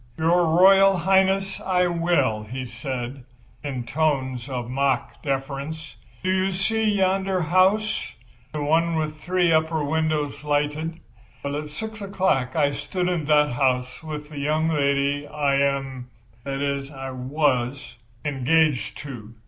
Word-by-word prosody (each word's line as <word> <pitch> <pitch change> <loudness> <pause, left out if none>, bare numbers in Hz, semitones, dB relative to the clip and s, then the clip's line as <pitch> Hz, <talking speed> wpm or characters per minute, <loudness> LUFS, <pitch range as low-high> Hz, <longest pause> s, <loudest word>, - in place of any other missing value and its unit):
"Your 170 +2 +3
Royal 195 0 +7
Highness, 190 +2 +2
I 180 -1 +2
will," 170 -11 +1
he 125 +4 -6
said, 125 +1 -5 0.4
in 135 -4 -3
tones 130 -2 -1
of 125 -3 -3
mock 135 +2 -1
deference. 140 +3 -4 0.3
"Do 185 - +1
you 190 +1 +1
see 220 +4 0
yonder 195 -2 +1
house—the 175 - 0
one 165 +3 +2
with 155 -1 -2
three 180 -2 +2
upper 160 -1 +1
windows 155 -1 -1
lighted? 150 +3 -1 0.4
Well, 140 0 -2
at 150 0 -4
6 220 +8 -7
o'clock 185 -10 0
I 145 -3 +3
stood 180 +5 -2
in 170 -4 -1
that 150 -1 +4
house 125 0 0
with 150 -2 -7
the 150 -2 -7
young 155 +3 +1
lady 140 -1 +1
I 145 -2 +1
am—that 135 -2 -3
is, 140 -1 -2
I 135 -1 -6
was—engaged 130 +1 0
to. 120 -6 -9
150 Hz, 130 wpm, -24 LUFS, 135-170 Hz, 0.4 s, Royal